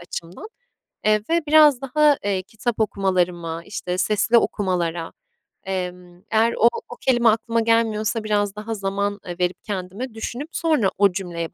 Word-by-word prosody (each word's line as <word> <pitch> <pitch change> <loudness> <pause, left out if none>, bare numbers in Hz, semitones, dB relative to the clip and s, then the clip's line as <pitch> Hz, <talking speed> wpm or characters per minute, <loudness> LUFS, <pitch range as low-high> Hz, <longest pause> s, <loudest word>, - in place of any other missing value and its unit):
açımdan. 175 - -8 0.6
Eee, 215 0 +4
ve 335 +1 +2
biraz 300 -4 +6
daha, 290 +2 +3
eee, 195 -2 0
kitap 220 +4 -4
okumalarıma, 180 -5 0
işte, 180 -3 -4
sesli 215 +4 +3
okumalara, 175 -6 -1 0.5
emm, 180 -2 -5
eğer 225 +1 +3
o 235 - +6 0.2
o - - -7
kelime 240 -3 +4
aklıma 230 +1 +1
gelmiyorsa 225 -1 +1
biraz 205 -1 0
daha 215 +2 -5
zaman, 200 0 -2
eee, 175 - -5
verip 180 0 -1
kendime, 200 +5 -5
düşünüp 245 +7 -5
sonra 305 - +1
o 200 -1 +4
cümleye 175 -3 -4
205 Hz, 145 wpm, -22 LUFS, 180-230 Hz, 0.6 s, biraz